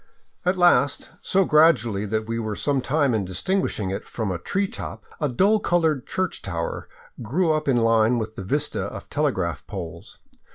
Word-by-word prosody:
At 180 +1 +2
last, 145 -6 +3
so 195 0 +2
gradually 120 -11 +4
that 110 +1 -2
we 115 0 -2
were 110 -2 -3
some 140 +2 0
time 140 -1 +1
in 110 -3 +1
distinguishing 95 - -1
it 100 +3 -5
from 110 -4 -3
a 90 - -3
tree 195 - -1
top, - - -8
a 150 - 0
dull 200 - +3
colored 160 -8 +1
church 185 -2 -2
tower 85 -3 -4 0.3
grew 160 +10 +1
up 155 -1 -1
in 130 -3 +3
line 115 +1 +3
with 110 -1 -4
the 95 - -6
vista 145 +10 -1
of - - -8
telegraph 95 - -1
poles. 90 -6 -8
125 Hz, 175 wpm, -24 LUFS, 105-160 Hz, 0.3 s, gradually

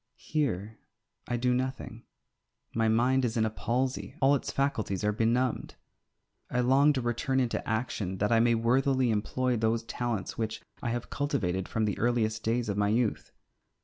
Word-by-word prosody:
Here 110 - -2 0.5
I 120 - -1
do 125 +1 +1
nothing. 125 -2 -3 0.7
My 115 0 +1
mind 125 +4 +3
is 120 -1 -1
in 110 - +3
a 110 - -1
palsy; 125 +4 -2
all 135 +1 +5
its 140 - -1
faculties 110 -9 -1
are 105 - +2
benumbed. 115 +3 0 0.7
I 125 - +1
long 135 +4 +5
to 130 - -1
return 120 +3 0
into 125 -3 0
action, 110 -4 -2
that 105 +3 0
I 115 - +5
may 120 0 +4
worthily 130 +2 +2
employ 125 +4 0
those 110 +1 +1
talents 120 -3 -3
which 110 -1 -3 0.2
I 120 - -2
have 120 +1 -4
cultivated 95 -10 -1
from 110 -1 0
the 105 - -2
earliest 115 -2 +1
days 115 +1 0
of 100 -1 -2
my 105 0 +2
youth. 115 0 0
115 Hz, 170 wpm, -29 LUFS, 110-130 Hz, 0.7 s, all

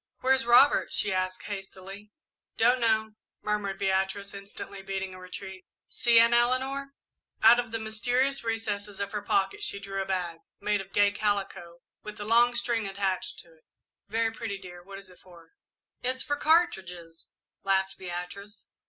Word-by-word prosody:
"Where's 265 -1 +2
Robert?" 245 +4 +6
she 205 - -1
asked 185 0 -2
hastily. 195 0 -8 0.5
"Don't 245 +3 +4
know," 220 -2 +2 0.3
murmured 210 -2 -1
Beatrice, 195 +1 -1
instantly 200 0 -9
beating 195 -1 -4
a 185 - -10
retreat. 190 +1 -9 0.3
"See, 235 -1 +3
Aunt 230 +1 +5
Eleanor." 265 +3 +1 0.5
Out 230 +2 +8
of 240 -2 -3
the 225 - -1
mysterious 245 +5 0
recesses 210 -3 -3
of 200 0 -3
her 210 - -3
pocket, 195 -1 0
she 200 - -2
drew 195 -1 -4
a - - -3
bag, 180 -3 -2 0.2
made 205 0 0
of 195 0 -13
gay 205 0 +4
calico, 195 -5 -2 0.2
with 210 0 -9
a 205 - -5
long 235 +2 +5
string 235 -3 -1
attached 195 -1 -2
to 170 - -21
it. 160 - -27 0.4
"Very 225 +2 0
pretty 225 -3 -5 0.2
what 195 +1 -10
is 200 0 -12
it 180 - -19
for, 170 -3 -17 0.5
dear?" 255 +1 +1
"It's 260 - -5
for 290 +2 -1
cartridges," 190 - 0 0.3
laughed 195 0 0
Beatrice. 185 +3 -7
200 Hz, 160 wpm, -28 LUFS, 190-230 Hz, 0.5 s, Out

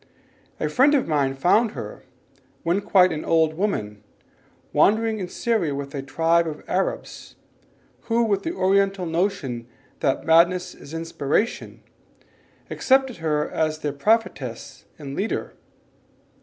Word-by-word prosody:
A 155 - 0
friend 265 - +4
of 270 - +1
mine 140 -4 +1
found 210 - +3
her, - - -7 0.6
when 175 +4 +1
quite 185 -2 +4
an 155 -1 -4
old 160 -1 +2
woman, 110 - -2 0.7
wandering 220 +1 +3
in 185 - -3
Syria 180 -8 -1
with 140 0 -6
a 140 - -3
tribe 165 +5 +1
of 150 -1 -6
Arabs, - - -3 0.7
who 235 0 +2
with 200 -3 +1
the 330 - -3
Oriental 195 0 +2
notion 165 - -2 0.3
that 135 - 0
madness 180 +2 +3
is 150 - -11
inspiration, 165 +5 -2 0.9
accepted 265 -2 +2
her 150 -2 0
as 155 -1 -1
their 145 -2 -2
prophetess 220 +10 -1
and 140 -2 -7
leader. 205 +7 -3
170 Hz, 130 wpm, -23 LUFS, 150-210 Hz, 0.9 s, friend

